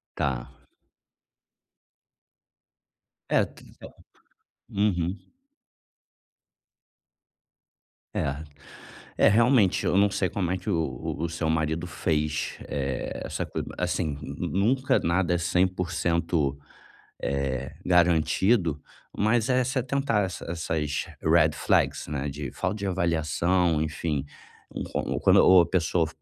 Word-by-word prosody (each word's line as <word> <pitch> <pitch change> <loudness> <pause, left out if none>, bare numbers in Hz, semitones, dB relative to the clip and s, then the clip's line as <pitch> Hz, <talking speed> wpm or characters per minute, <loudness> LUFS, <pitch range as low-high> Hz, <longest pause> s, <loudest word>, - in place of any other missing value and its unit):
Tá. 65 -3 -3 2.7
É - - +4
tempo, - - -15 0.8
uhum. 95 -2 0 2.9
É, 70 +2 -2 0.7
é - - +5
realmente, 115 -2 +4
eu - - +1
não 100 +1 +5
sei 95 -2 0
como 95 -4 -2
é 95 - 0
que 90 - -14
o 80 -9 -1 0.2
o 85 +1 -1
seu 85 0 -2
marido 80 +1 0
fez, 75 -2 -1
eh, 70 -2 -3
essa - - -3
coisa - - -5
assim, 75 -2 -1 0.2
nunca 125 +7 +1
nada 90 +1 +1
é - - +2
100%, 85 -4 0 0.6
eh, 70 -1 -2
garantido, 85 0 +3 0.4
mas 110 +3 +2
é 130 0 +3
se 130 +2 -2
atentar 130 -4 0
essas 95 - -7
essas 80 -3 -2 0.2
Red 80 -1 +4
Flags, - - +1
né, 70 -1 -3
de 70 -1 -5
falta 95 +3 -2
de 100 -1 -3
avaliação, 85 -1 +1
enfim, 75 -2 -2 0.5
uma - - -5 0.2
ou - - -2
quando 95 -1 +6
a - - +2
pessoa 85 -2 +1
85 Hz, 110 wpm, -26 LUFS, 75-95 Hz, 2.9 s, quando